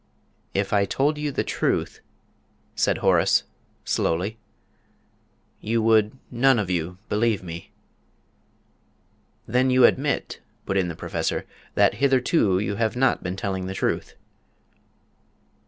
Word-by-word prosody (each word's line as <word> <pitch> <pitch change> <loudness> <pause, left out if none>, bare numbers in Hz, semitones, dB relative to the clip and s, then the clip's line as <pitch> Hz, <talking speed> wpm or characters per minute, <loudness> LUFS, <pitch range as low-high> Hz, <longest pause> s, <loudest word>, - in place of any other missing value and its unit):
"If - - 0
I 100 -1 +3
told 150 +7 0
you 150 -1 -2
the - - -1
truth," - - -1 0.7
said - - +1
Horace, - - +4 0.4
slowly, 95 +7 -1 1.2
"you 115 +2 -1
would 110 +1 +3
none 130 +1 +4
of 100 -4 -1
you 90 +1 -2
believe 105 -2 0
me!" 85 -1 -8 1.7
"Then 125 +3 +2
you 130 -1 +6
admit," 140 +3 0 0.3
put 95 - -2
in 95 -2 +2
the 85 - -5
Professor, - - -3 0.3
"that - - +4
hitherto 130 - +3
you 100 +1 -2
have 110 +1 0
not 130 +2 +2
been 90 +1 -4
telling 95 -1 -3
the 95 - -5
truth?" - - -2
110 Hz, 125 wpm, -24 LUFS, 95-130 Hz, 1.7 s, you